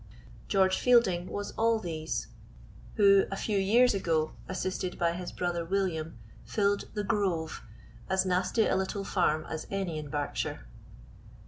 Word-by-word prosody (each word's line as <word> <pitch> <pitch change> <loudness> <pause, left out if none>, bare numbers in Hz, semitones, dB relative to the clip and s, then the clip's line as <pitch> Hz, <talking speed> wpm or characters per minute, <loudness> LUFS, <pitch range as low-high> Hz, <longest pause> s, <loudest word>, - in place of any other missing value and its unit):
George 190 -1 +3
Fielding 195 -8 +3
was 205 0 -4
all 230 0 +3
these, 160 -6 -3 0.7
who, 200 -1 +6
a 195 - -3
few 205 0 -1
years 230 +6 +4
ago, 160 -5 0 0.2
assisted 185 0 -3
by 170 -1 +2
his 175 +1 -5
brother 175 -1 -2
William, 165 -3 -2 0.3
filled 200 -1 0
"The 210 - -1
Grove" 190 -7 -1 0.5
as 190 0 +2
nasty 185 +4 +2
a - - +1
little 190 +1 -2
farm 155 -5 +1
as 160 - -5
any 190 -5 -2
in 150 -1 -7
Berkshire. 145 - -3
190 Hz, 140 wpm, -29 LUFS, 170-200 Hz, 0.7 s, who